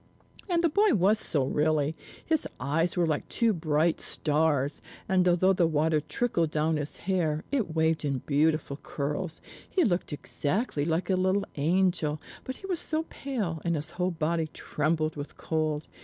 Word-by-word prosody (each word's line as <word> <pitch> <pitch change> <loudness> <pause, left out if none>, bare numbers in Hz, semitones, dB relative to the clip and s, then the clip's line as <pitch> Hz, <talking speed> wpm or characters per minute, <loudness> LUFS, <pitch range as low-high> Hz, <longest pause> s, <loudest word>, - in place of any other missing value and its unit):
And 345 -1 +2
the - - +6
boy 410 - +4
was 205 +3 +3
so 140 -4 +1
really. 150 +2 +1 0.3
His 320 -2 +2
eyes 160 +7 0
were 175 - +3
like 155 -2 -1
two 230 -2 +2
bright 160 -1 +1
stars; 145 -2 0 0.3
and 185 -1 +3
although 180 +2 +4
the 175 -3 +3
water 155 0 +2
trickled 170 +1 0
down 155 +1 +1
his 145 0 -4
hair, 165 -5 0
it 225 - -1
waved 160 0 +2
in 135 -3 -1
beautiful 155 -1 +1
curls. 150 +4 -4 0.3
He 370 - +2
looked 180 -6 0
exactly 145 - -1
like 165 +4 0
a - - +4
little 190 +2 +1
angel, 165 -1 +1 0.3
but 260 - -4
he 385 - -11
was 365 -4 -1
so 315 +1 -1
pale, 210 - -3
and 170 -1 +1
his 155 +2 -4
whole 180 +1 0
body 165 -1 -1
trembled 155 +1 -1
with 145 0 -7
cold. 155 -1 -1
160 Hz, 170 wpm, -28 LUFS, 150-185 Hz, 0.3 s, the